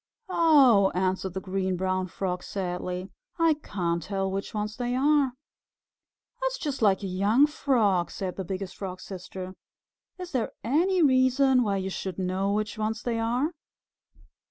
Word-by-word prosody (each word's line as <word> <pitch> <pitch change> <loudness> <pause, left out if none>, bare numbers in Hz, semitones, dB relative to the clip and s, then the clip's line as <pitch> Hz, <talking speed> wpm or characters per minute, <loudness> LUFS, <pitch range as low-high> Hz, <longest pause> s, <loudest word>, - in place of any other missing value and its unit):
"Oh," 275 - +5
answered 190 0 -1
the - - -1
Green 190 -1 -1
Brown 185 0 -1
Frog 180 0 -3
sadly, 180 0 -4 0.3
"I 330 -2 +4
can't 170 - -2
tell 195 +2 -2
which 195 +1 -3
ones 210 0 -3
they 245 +1 -2
are." 280 -1 +3 1.1
"That's - - -1
just 290 - -4
like 200 -2 +3
a - - -2
young 200 +8 +3
Frog," 225 - +1
said 185 -2 -4
the 190 - -4
Biggest 190 +1 -5
Frog's 185 -2 -6
Sister. 185 0 -7 0.6
"Is 365 -1 -7
there 245 -4 -1
any 345 - +2
reason 260 -1 +4
why 205 -4 +1
you 190 0 -3
should 190 -2 -4
know 190 +1 -1
which 210 +1 -2
ones 220 +1 -2
they 230 -2 -1
are? 245 +7 0
200 Hz, 155 wpm, -27 LUFS, 185-260 Hz, 1.1 s, Oh